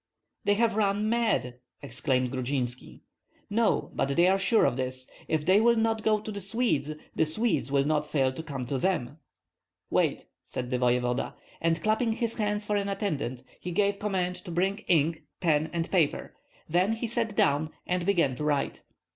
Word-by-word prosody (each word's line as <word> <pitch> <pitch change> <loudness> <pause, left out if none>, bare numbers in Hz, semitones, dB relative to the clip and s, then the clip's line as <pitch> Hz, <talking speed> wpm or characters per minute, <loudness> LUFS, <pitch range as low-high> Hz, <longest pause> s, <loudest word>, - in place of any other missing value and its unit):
"They 205 - +4
have 225 0 +2
run 210 0 +1
mad!" 220 - 0 0.2
exclaimed 130 0 0
Grudzinski. 130 -1 -3 0.5
"No; 225 +1 +1
but - - 0
they 170 - +5
are 190 +1 +3
sure 215 +3 +3
of - - +2
this, 130 0 -4 0.2
if 155 -2 0
they 190 +4 +5
will 235 +1 +5
not 225 -1 +1
go 215 -1 +2
to 215 +1 -6
the 200 -1 -5
Swedes, 195 - 0 0.2
the - - +3
Swedes 160 -1 0
will 140 -1 +3
not 150 0 +1
fail 135 -3 +1
to 145 - -6
come 135 -5 -5
to 135 +2 -2
them." 150 -5 -1 0.7
"Wait!" - - +1 0.2
said 125 0 -5
the 125 - 0
voevoda. 125 0 +1 0.3
And 165 0 +1
clapping 220 +2 +2
his 230 0 -1
hands 210 -1 -1
for 210 0 +1
an 200 0 -1
attendant, 145 - -2 0.2
he 180 - -5
gave 200 +2 +1
command 185 -3 -1
to 180 - -11
bring 190 +4 0
ink, 160 -2 +2 0.2
pen, 160 -3 +2
and 170 -1 -2
paper; 170 -6 +1 0.3
then 180 +6 +2
he 225 +1 -3
sat 230 -2 -1
down 145 0 +2 0.2
and 180 0 -1
began 170 -9 +2
to 150 - -4
write. 145 -2 0
175 Hz, 180 wpm, -28 LUFS, 140-210 Hz, 0.7 s, they